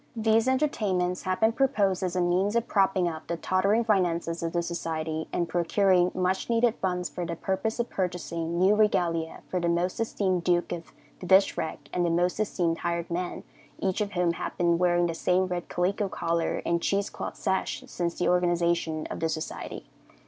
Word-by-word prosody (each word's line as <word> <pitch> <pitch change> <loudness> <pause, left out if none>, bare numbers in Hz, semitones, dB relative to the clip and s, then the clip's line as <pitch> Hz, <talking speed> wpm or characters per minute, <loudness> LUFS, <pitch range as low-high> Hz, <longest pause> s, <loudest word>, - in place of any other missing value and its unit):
These 225 +1 +2
entertainments 205 -10 0
had 185 0 -1
been 220 +1 +5
proposed 210 -8 +1
as 185 -1 -2
a 180 - +2
means 185 +4 +1
of 235 0 +1
propping 195 -3 +2
up 160 -2 -5
the 170 - -2
tottering 195 +6 +2
finances 175 -6 0
of 165 -1 -2
the 170 0 0
society, 160 -2 -3
and 170 - 0
procuring 180 +1 +3
much 185 +3 0
needed 230 0 +3
funds 180 -2 -1
for 150 +4 -5
the 170 0 -3
purpose 200 +6 -2
of 235 - 0
purchasing 170 -2 -2
new 190 +3 +5
regalia 170 -6 +1
for 185 - -1
the 170 -1 0
Most 175 +4 0
Esteemed 190 -5 0
Duke 175 0 +1
of 170 -1 -6 0.3
the 180 - -7
Dishrag 190 -4 +3 0.2
and 180 - +1
the 170 - +2
Most 175 +3 +1
Esteemed 175 -6 0
Hired 170 0 -2
Man, 175 +1 -3 0.3
each 190 +2 -1
of 205 -1 -2
whom 175 -1 +1
had - - -5
been 170 -1 +2
wearing 175 -1 +3
the 170 - -1
same 180 +3 +1
red 180 -1 -4
calico 195 +3 0
collar 170 -2 -1
and 170 0 +1
cheese 200 +2 0
cloth - - -6
sash 190 0 -1
since 170 -1 -3
the 180 - 0
organization 170 -3 +1
of - - -4
the 160 - 0
society. 155 0 -5
180 Hz, 190 wpm, -27 LUFS, 170-195 Hz, 0.3 s, been